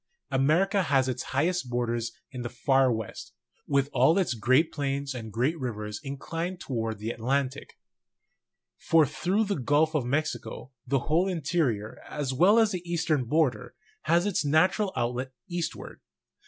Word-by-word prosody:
America 160 +9 +3
has 135 -6 +2
its 130 - -2
highest 160 +1 0
border 120 -1 -1 0.3
in 125 - -6
the 120 - -4
far 135 +2 +2
west, 110 -3 -5 0.3
with 140 -1 +2
all 165 - +4
its 185 -9 +1
great 130 +8 +3
plains 140 -1 -2
and 115 -3 -7
great 125 +9 +1
rivers 105 -4 -4
inclined 165 +6 -4
toward 115 - -3
the 110 +3 -3
Atlantic; 130 +4 -2 1.0
for 165 -2 +4
through 190 - 0
the 200 -6 -2
Gulf 150 +5 +2
of 150 -4 +1
Mexico 135 0 -3 0.2
the 135 0 +1
whole 165 +7 +2
interior, 145 - -1
as 145 -3 -3
well 185 - +5
as 220 -2 +4
the 180 -3 -3
eastern 160 -6 0
border, 130 -4 0 0.3
has 170 +3 +3
its 205 -5 0
natural 185 +7 +2
outlet 125 +2 -2
eastward. 175 -2 -5
140 Hz, 150 wpm, -27 LUFS, 125-165 Hz, 1.0 s, well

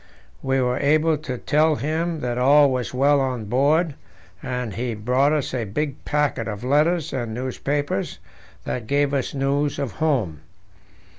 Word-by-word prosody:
We 135 0 +1
were 125 -1 0
able 155 +3 +3
to 130 -4 -5
tell 155 +4 +2
him 160 +3 -2
that 125 0 -2
all 140 +2 +5
was 125 -4 -2
well 140 +3 +3
on 125 -4 -2
board, 145 - +2 0.5
and 125 -4 -3
he 120 +1 -3
brought 125 +7 +2
us 150 -4 -1
a 125 -3 -1
big 140 +7 -3
packet 145 -6 0
of 105 0 -5
letters 155 +5 +2
and 120 -4 -3
newspapers 130 -1 -2 0.5
that 120 -3 -4
gave 145 +1 +1
us 140 0 -1
news 140 +1 0
of 140 - -2
home. 125 - -1
135 Hz, 155 wpm, -23 LUFS, 125-150 Hz, 0.5 s, all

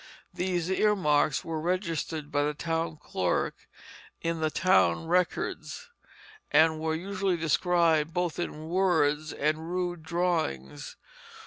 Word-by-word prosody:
These 180 -1 -1
earmarks 180 -9 +2
were 160 -1 -3
registered 165 -4 -2
by 145 - +1
the 150 +1 -1
town 165 0 -2
clerk 90 -10 -2 0.5
in 165 0 -2
the 155 0 +1
town 95 - +3
records, 180 - -1 0.6
and 160 +1 +4
were 160 0 -1
usually 190 +1 -1
described 165 0 +2
both 175 -1 -2
in 155 -2 -4
words 155 -4 +1
and 155 +2 -1
rude 175 -2 -2
drawings. 160 - -2
165 Hz, 115 wpm, -28 LUFS, 155-180 Hz, 0.6 s, and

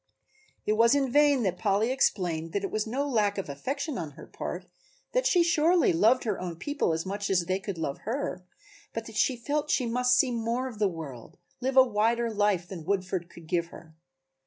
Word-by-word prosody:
It 210 - +2
was 230 +4 +5
in 270 -3 +1
vain 290 -2 +4
that 180 -3 -1
Polly 210 +3 +1
explained 170 -11 0
that 200 - -1
it 195 - -3
was 215 0 -1
no 270 +6 -1
lack 210 -6 +1
of 195 - -4
affection 275 - -3
on 155 -4 -6
her - - -11
part, 180 +1 -6 0.5
that - - +2
she 350 -2 +4
surely 335 - +3
loved 220 +9 +4
her 210 -5 -2
own 175 -2 -4
people 285 - -1
as 160 +2 -2
much 200 +1 -3
as 180 -3 +2
they 185 +2 0
could 195 -2 -5
love 155 -4 -3
her, 220 -6 -3 0.5
but 225 0 -4
that 225 - -10
she 255 +4 +2
felt 290 +5 -2
she 255 - +2
must 250 +2 +2
see 260 - +3
more 235 +2 -1
of 230 -5 -9
the 210 - +3
world, 155 -9 -8 0.2
live 265 +1 -1
a 260 - +10
wider 230 0 +1
life 205 -4 +1
than 175 -3 -7
Woodford 185 -1 -2
could 170 - -13
give 170 0 0
her. 160 -1 -14
215 Hz, 210 wpm, -28 LUFS, 180-255 Hz, 0.5 s, a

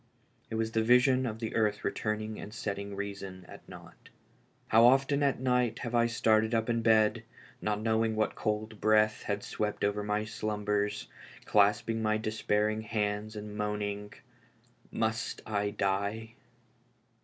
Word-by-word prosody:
It - - -4
was 110 0 -1
the 115 - +1
vision 125 +2 +4
of 110 -2 -4
the 110 -1 -5
earth 105 -2 +1
returning 110 0 -2
and 105 - -8
setting 100 -2 -4
reason 100 -2 -6
at - - -13
naught. - - -13 0.6
How 115 +1 +6
often 135 +3 +3
at 140 -3 +1
night 125 -2 +1
have 120 - -4
I 120 0 +4
started 110 -1 +2
up 115 +1 +1
in 115 0 0
bed, 110 -1 +3 0.4
not 105 0 -1
knowing 110 0 +1
what 110 0 0
cold 110 0 -3
breath 110 0 +3
had 100 -1 -3
swept 105 -1 -3
over 100 +1 +1
my 105 +1 -1
slumbers, 105 -1 -2 0.4
clasping 105 +2 +2
my 110 0 +1
despairing 110 0 0
hands 105 0 -2
and 105 0 -7
moaning, 105 -1 -3 0.4
" 120 +1 -33
Must 110 0 -3
I 105 -1 -1
die? 100 +3 -2
110 Hz, 150 wpm, -30 LUFS, 105-115 Hz, 0.6 s, How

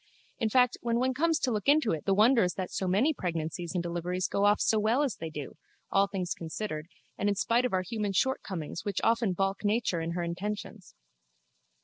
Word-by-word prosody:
In 225 -3 +1
fact 250 +1 +3
when 235 -1 0
one 260 +2 +1
comes 325 +4 +2
to 265 -5 0
look 210 0 -2
into 290 -5 +4
it 160 - -3
the 195 - +3
wonder 230 +4 +5
is 180 -1 +1
that 185 -2 -4
so 190 - -2
many 220 - +3
pregnancies 170 - -4
and 175 - 0
deliveries 175 +2 -2
go 200 - +1
off 205 0 +4
so 220 - +2
well 225 +7 +2
as 265 -8 -2
they 165 - -5
do, 150 -3 -7 0.3
all 195 0 +4
things 190 -3 -3
considered 160 -1 -5 0.3
and 205 - +1
in 200 - +1
spite 235 +5 +2
of 250 - -1
our 185 0 +1
human 210 0 -2
shortcomings 185 - -2
which 200 -3 -2
often 230 -4 +2
baulk 195 +2 -1
nature 205 -5 +1
in 165 +1 -3
her 175 0 -2
intentions. 195 +2 -5
200 Hz, 215 wpm, -29 LUFS, 175-230 Hz, 0.3 s, wonder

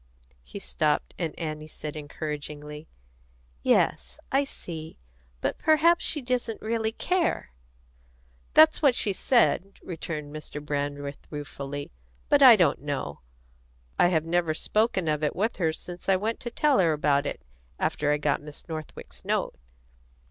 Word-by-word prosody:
He 60 - -10
stopped, 155 -6 0
and 165 -4 -3
Annie 155 -2 -4
said 150 -1 -7
encouragingly: 150 0 -6 0.7
"Yes, 65 +1 +2
I 275 +1 +3
see. 160 - -8 0.4
But - - -1
perhaps 320 +2 +4
she 300 -4 0
doesn't 245 -3 -1
really 220 0 -1
care." 350 - 0 1.0
"That's 315 0 +7
what 275 -5 +5
she 200 - +1
said," 200 -3 +2
returned 155 -4 -5
Mr. 150 -1 -6
Brandreth 145 -1 -4
ruefully. 145 -1 -6 0.4
"But - - +5
I - - +11
don't - - +2
know. - - -4 0.8
I - - +6
have 160 -3 +1
never 165 -1 +1
spoken 210 -2 +1
of 155 0 0
it 150 - 0
with 220 +5 0
her 165 -4 +2
since 175 +3 -7
I 190 - +6
went 215 +4 -1
to 240 - -5
tell 285 +3 +3
her 165 -4 +4
about 145 -1 +2
it, - - -5 0.3
after 150 0 0
I 150 - +3
got 145 -1 0
Miss 150 0 -10
Northwick's 155 -2 -8
note." - - 0
160 Hz, 145 wpm, -27 LUFS, 150-220 Hz, 1.0 s, I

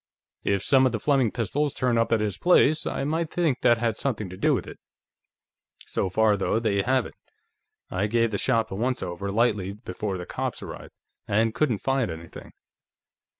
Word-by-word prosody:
If 100 -1 0
some 135 -1 +5
of 125 - -2
the 110 - -1
Fleming 135 -2 +2
pistols 130 +7 -1
turn 120 -2 +1
up 115 -1 +1
at 115 -2 +3
his 105 -3 -1
place, 160 -3 +4
I - - -2
might 160 +3 -1
think 160 -8 0
that 120 - +4
had 115 -2 -1
something 110 -8 -2
to 90 - -8
do - - +2
with - - -3
it. - - -11 1.1
So 95 - -1
far, 110 +3 +3
though, 100 - 0
they 105 -3 +1
haven't. 130 +3 0 0.8
I 95 +3 0
gave 115 +1 +1
the 100 - -2
shop 115 -4 +1
a - - -3
once 125 +4 -1
over 90 +3 -4
lightly 100 -3 +1
before 100 -2 -5
the 90 - -6
cops - - -4
arrived, - - -9 0.3
and 110 +2 +2
couldn't 120 -5 0
find 135 -4 +1
anything." 80 0 -9
115 Hz, 190 wpm, -25 LUFS, 100-130 Hz, 1.1 s, some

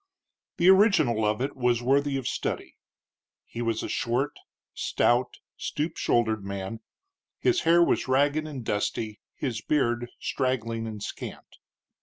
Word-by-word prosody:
The 175 - +3
original 190 - +5
of 105 +2 0
it 140 +2 -2
was 120 -2 +1
worthy 140 +2 +2
of 130 - -3
study. - - -3 0.7
He 115 - -6
was 115 -2 -1
a - - -3
short, 130 +5 -1 0.4
stout, 120 +1 +1 0.2
stoop 155 +2 -3
shouldered 110 -3 +1
man; 100 +3 -5 0.6
his 370 -1 +2
hair 170 +1 +7
was - - +1
ragged 145 +4 +2
and 135 -6 -7
dusty, 105 +1 -2
his 120 -6 -3
beard 120 -4 0
straggling 115 -4 -1
and 105 -2 -6
scant. - - -8
120 Hz, 135 wpm, -27 LUFS, 115-145 Hz, 0.7 s, hair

